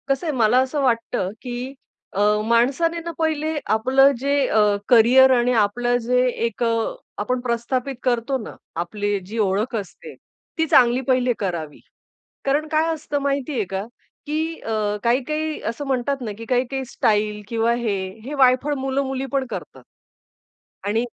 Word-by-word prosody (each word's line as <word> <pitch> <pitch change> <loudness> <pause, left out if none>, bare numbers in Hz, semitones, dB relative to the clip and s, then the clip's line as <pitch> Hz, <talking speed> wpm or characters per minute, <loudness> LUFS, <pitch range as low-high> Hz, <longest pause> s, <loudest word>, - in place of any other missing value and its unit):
कसं 275 +4 0
आहे 310 - 0
मला 235 +1 +4
असं 265 +3 0
वाटतं, 230 -7 0
की 250 +1 -5 0.4
अ, 195 - -3 0.3
माणसाने 270 +9 +2
ना 335 0 -5
पहिले 315 -1 0 0.2
आपलं 265 +5 +4
जे 280 +2 -1 0.2
अ, - - 0 0.3
करिअर 250 +3 +7
आणि 240 +1 +2
आपलं 240 +4 +1
जे 250 +1 +3 0.2
एक 230 +1 -3
अ, 230 -1 0 0.3
आपण 250 +4 -1
प्रस्थापित 250 +2 -2
करतो 250 +1 0
ना, - - -9 0.2
आपली 205 +4 -2
जी 215 +5 -7
ओळख 210 +4 0
असते, 195 -5 -7 0.4
ती 320 - +2
चांगली 245 -2 +5
पहिले 255 -1 +2
करावी, 170 -7 -4 0.7
कारण 290 +3 +1
काय 320 +1 +2
असतं 300 -2 -3
माहितीये 275 -3 -1
का, 195 +1 -3 0.4
की 315 +2 -2
अ, 215 -2 -1
काही-काही 305 +6 0
असं 260 +5 -7
म्हणतात 270 +1 -1
ना, 225 -4 -4
की 230 - -8
काही-काही 260 +2 -1
स्टाईल 210 -3 0
किंवा 230 +1 +1
हे, 235 -4 -1 0.3
हे 285 - -5
वायफळ 265 +2 +3
मुलं-मुली 270 0 -2
पण 275 -1 0
करतात. - - -8 1.0
आणि 220 +4 0
250 Hz, 150 wpm, -22 LUFS, 225-275 Hz, 1.0 s, करिअर